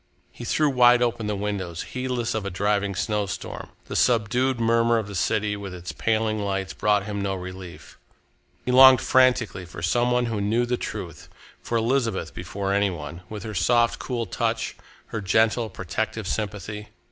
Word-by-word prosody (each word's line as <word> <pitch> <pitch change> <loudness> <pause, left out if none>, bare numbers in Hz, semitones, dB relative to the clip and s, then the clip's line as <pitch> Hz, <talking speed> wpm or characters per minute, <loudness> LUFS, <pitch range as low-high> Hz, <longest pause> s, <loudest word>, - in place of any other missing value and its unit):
He - - -9
threw 155 - +2
wide 125 -2 +5
open 115 -2 -1
the 105 - -1
windows, 95 -4 -3
heedless 125 -2 -3
of 110 - -2
a 100 - -3
driving 100 +1 0
snowstorm. 105 -1 -3 0.2
The - - -6
subdued 125 +2 +2
murmur 115 0 +3
of 110 - -1
the 100 - -8
city, 105 +3 0
with 100 -2 -7
its 90 -1 -6
paling 110 +5 0
lights, 95 -2 -2
brought 105 -1 +1
him 105 -1 -3
no 100 -1 -1
relief. 90 -1 -9 0.7
He 125 - 0
longed 130 0 +9
frantically 125 -7 +2
for 85 -2 -9
some 120 +9 +2
one 125 0 +2
who 110 -3 -2
knew 115 +4 +1
the 125 +1 0
truth, - - -7 0.3
for 115 - -1
Elizabeth 115 +1 0
before 100 -1 -3
any 100 0 +2
one, 85 0 -7
with 105 -2 -6
her 110 - -6
soft, 115 +6 +2
cool 120 -3 -3
touch, 90 - -2 0.3
her 115 - -4
gentle, 110 +4 +2
protective 100 +3 -4
sympathy. 105 0 -4
105 Hz, 170 wpm, -24 LUFS, 100-120 Hz, 0.7 s, longed